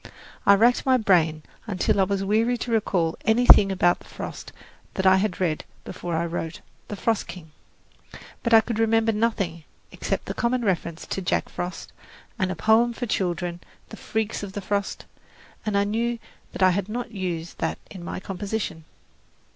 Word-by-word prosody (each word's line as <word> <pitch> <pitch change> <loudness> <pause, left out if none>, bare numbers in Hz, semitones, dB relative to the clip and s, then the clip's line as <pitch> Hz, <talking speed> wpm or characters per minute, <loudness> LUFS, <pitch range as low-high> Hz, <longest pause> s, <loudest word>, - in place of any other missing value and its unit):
I 200 - +9
racked 235 +4 +4
my 260 -2 +4
brain 165 -8 +2 0.2
until 200 -1 +1
I 190 - +5
was 195 0 -1
weary 225 +5 +2
to 240 - -4
recall 185 -7 +1
anything 220 -3 +6
about 175 -2 +3
the - - -17
frost - - -7 0.4
that 190 - -1
I 190 0 +7
had 190 -1 -1
read 165 -5 0 0.2
before 175 -1 -5
I 165 +1 0
wrote 165 -1 -4 0.3
"The 205 - -5
Frost 225 +1 0
King"; 160 -4 -10 0.9
but 235 - -1
I 225 -1 +8
could 225 0 -4
remember 225 0 +3
nothing, 205 -7 -1 0.3
except - - -3
the - - -4
common 240 0 0
reference 170 -4 -1
to 195 - -3
Jack 180 - 0
Frost, 175 +1 -6 0.5
and 185 -1 +1
a - - -3
poem 230 +4 +3
for 245 - -4
children, 175 -4 -1 0.3
"The - - -8
Freaks 220 -1 -2
of 200 -2 -7
the 205 - -4
Frost," 200 0 -2 0.6
and 205 -1 +1
I 200 - +4
knew 230 +3 -1 0.4
I 185 -1 +6
had 200 +2 -2
not 240 +1 -4
used 175 -5 -4
that 160 - -1
in 185 -4 -8
my 180 - -5
composition. 195 -3 -4
200 Hz, 175 wpm, -25 LUFS, 180-225 Hz, 0.9 s, I